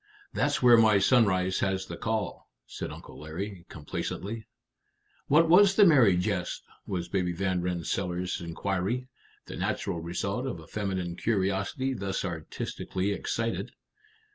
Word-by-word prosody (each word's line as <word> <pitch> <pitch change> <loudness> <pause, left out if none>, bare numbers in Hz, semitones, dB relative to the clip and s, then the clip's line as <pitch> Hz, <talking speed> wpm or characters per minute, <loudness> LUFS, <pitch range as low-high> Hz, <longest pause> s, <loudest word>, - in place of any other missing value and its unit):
"That's 145 -2 0
where 120 -1 +8
my 110 -2 +6
sunrise 95 -4 +3
has 95 -1 0
the 85 - -7
call," 110 +3 -3 0.2
said - - -6
Uncle - - -10
Larry, 90 +4 -6
complacently. 100 +8 -5 0.8
"What 165 +4 +5
was 195 +4 +6
the 205 - +7
merry 125 - +6
jest?" 90 -1 -2 0.2
was 90 -2 -3
Baby 90 -1 0
Van 90 0 0
Rensselaer's 90 +1 -2
inquiry, 95 +8 -2 0.4
the - - -8
natural 85 - -2
result 100 +9 -2
of 90 - -4
a 80 - -12
feminine 95 -2 -3
curiosity 100 +5 0
thus 95 -4 -3
artistically 90 +3 -3
excited. 115 +3 -2
95 Hz, 130 wpm, -28 LUFS, 90-115 Hz, 0.8 s, where